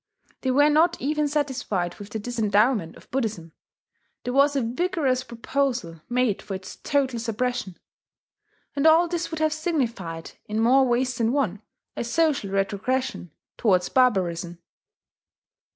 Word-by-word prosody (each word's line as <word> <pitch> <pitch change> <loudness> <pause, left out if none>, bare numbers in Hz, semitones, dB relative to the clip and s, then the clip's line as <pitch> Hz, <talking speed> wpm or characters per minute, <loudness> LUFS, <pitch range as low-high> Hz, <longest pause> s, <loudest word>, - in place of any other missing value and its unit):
They 260 - -1
were 290 +3 +5
not 330 +3 +3
even 300 +2 0
satisfied 260 - -2
with 205 0 -9
the 220 - -4
disendowment 215 -4 +1
of - - -18
Buddhism: 220 -11 -2 0.7
there 245 - -3
was 280 +1 +4
a 275 - +2
vigorous 265 0 0
proposal 235 - -2
made 245 -4 +1
for 195 - -5
its 190 0 -9
total 265 -4 0
suppression! 230 -3 -2 1.0
And 285 +2 +3
all 330 +2 +6
this 345 0 -2
would 320 - -5
have 310 -1 +2
signified, 235 - -3 0.2
in 215 0 -2
more 260 +4 +5
ways 250 +1 +1
than 230 0 +1
one, 215 -9 0 0.3
a - - -2
social 280 -2 +1
retrogression 200 +2 -1 0.3
towards 185 -6 +2
barbarism. 180 -9 +1
245 Hz, 135 wpm, -25 LUFS, 205-280 Hz, 1.0 s, all